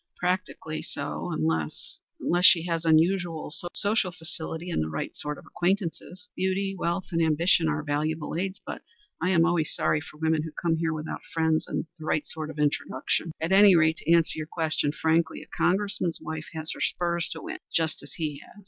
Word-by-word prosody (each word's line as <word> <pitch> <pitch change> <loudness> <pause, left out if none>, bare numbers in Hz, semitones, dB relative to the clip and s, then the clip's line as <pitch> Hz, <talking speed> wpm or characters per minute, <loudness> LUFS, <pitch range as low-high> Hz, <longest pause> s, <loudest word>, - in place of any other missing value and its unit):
"Practically 180 -3 -2
so, - - -4
unless 80 -1 -2 0.2
unless 175 +1 +2
she 170 -3 +8
has 165 -1 -1
unusual 165 -1 +2 0.2
social 205 -3 +2
facility, 165 0 -4
and - - 0
the 80 - -2
right 80 0 -4
sort 150 0 -4
of - - -13
acquaintances. 180 0 -2
Beauty, 195 +1 0
wealth 175 0 -2
and 165 -1 +1
ambition 165 +1 +3
are 150 0 -1
valuable 155 +1 -2
aids, 190 +3 -2
but - - -6 0.4
I 180 - +2
always 165 -2 +3
am - - -4
sorry 150 - +1
for 150 - -12
women 160 0 +1
who 155 0 -6
come 165 -2 +1
here 165 0 0
without 155 0 -4
friends, 160 -1 +1
and - - -2
er - - -21
the 155 - -8
right 155 - 0
sort 155 -1 -5
of 155 - -8
introduction. 150 +2 0
At 165 +3 -2
any 195 -1 +8
rate, 160 0 +4
to 165 - -1
answer 165 -2 +4
your 155 - -4
question 155 -3 0
frankly, 160 +2 +1
a - - -18
Congressman's 180 -2 +1
wife 155 0 -6
has 160 0 -1
her - - -9
spurs 170 -1 0
to - - -8
win - - -6
just 160 -1 +1
as - - -9
he 150 -3 -3
has. - - -17
165 Hz, 195 wpm, -27 LUFS, 155-175 Hz, 0.4 s, she